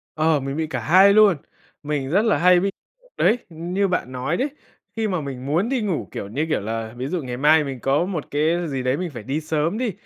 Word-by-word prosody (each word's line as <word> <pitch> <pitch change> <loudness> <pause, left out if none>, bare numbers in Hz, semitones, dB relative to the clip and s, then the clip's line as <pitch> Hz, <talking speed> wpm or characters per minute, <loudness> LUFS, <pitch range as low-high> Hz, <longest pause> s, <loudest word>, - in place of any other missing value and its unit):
Ờ, 155 -1 +2
mình 135 +2 -4
bị 160 -1 -1
cả - - -3
hai 190 +5 +6
luôn, 205 -5 +6 0.5
mình 145 -2 -2
rất 195 +7 +3
là 220 - +3
hay 180 +1 +5
bị, 195 +2 0 0.5
đấy, 235 - +3
như 175 +5 -1
bạn 180 -8 -2
nói 130 +6 -2
đấy, 280 +3 0 0.5
khi 225 -1 0
mà 180 -6 -1
mình 130 -2 -6
muốn 165 +10 0
đi 260 -3 0
ngủ, 195 -7 -2
kiểu, - - -5
như 140 +9 -1
kiểu 155 - 0
là, 110 +1 -4
ví 130 +2 -3
dụ 170 +2 -2
ngày 125 -2 -5
mai 150 +3 +5
mình 135 -3 -5
có 135 +7 +1
một 175 -6 -5
cái 160 +4 +1
gì 135 -3 -3
đấy 130 +2 +1
mình 180 -1 -3
phải 120 -6 -8
đi 140 +7 -2
sớm 160 +4 -1
đi, 240 -2 -1
155 Hz, 245 wpm, -22 LUFS, 135-185 Hz, 0.5 s, hai